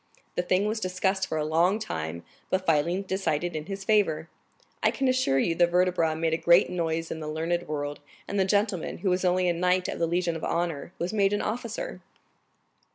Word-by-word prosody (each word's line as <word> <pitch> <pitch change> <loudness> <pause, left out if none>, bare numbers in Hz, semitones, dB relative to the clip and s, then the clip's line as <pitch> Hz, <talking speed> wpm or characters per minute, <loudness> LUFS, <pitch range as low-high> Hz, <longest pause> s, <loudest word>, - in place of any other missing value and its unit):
The - - 0
thing 185 +3 +1
was 215 +1 -1
discussed 190 0 0
for 160 - -2
a 150 - 0
long 170 +6 +3
time, 85 - -4 0.3
but 185 0 0
finally 170 +4 +2
decided 175 -3 -1
in 155 +1 -4
his 195 0 -5
favor. 170 -7 +2 0.5
I - - +4
can 270 - -1
assure 255 - +2
you 165 +5 +2
the 175 +1 +4
vertebra 175 -2 +2
made 160 0 0
a - - +2
great 170 +2 +5
noise 165 -2 -2
in 160 - -4
the 155 - -6
learned 165 +3 -2
world, 145 -1 -3 0.3
and 200 - -1
the - - +5
gentleman, 200 -3 0
who 190 - +3
was 180 +1 0
only 180 0 +2
a 175 - +3
knight 180 +2 +1
of - - -4
the 165 - +2
Legion 170 0 0
of 160 - -6
Honor, 170 -2 -2
was 175 +4 -3
made 200 -1 +3
an 205 - 0
officer." - - -4
175 Hz, 210 wpm, -27 LUFS, 160-190 Hz, 0.5 s, great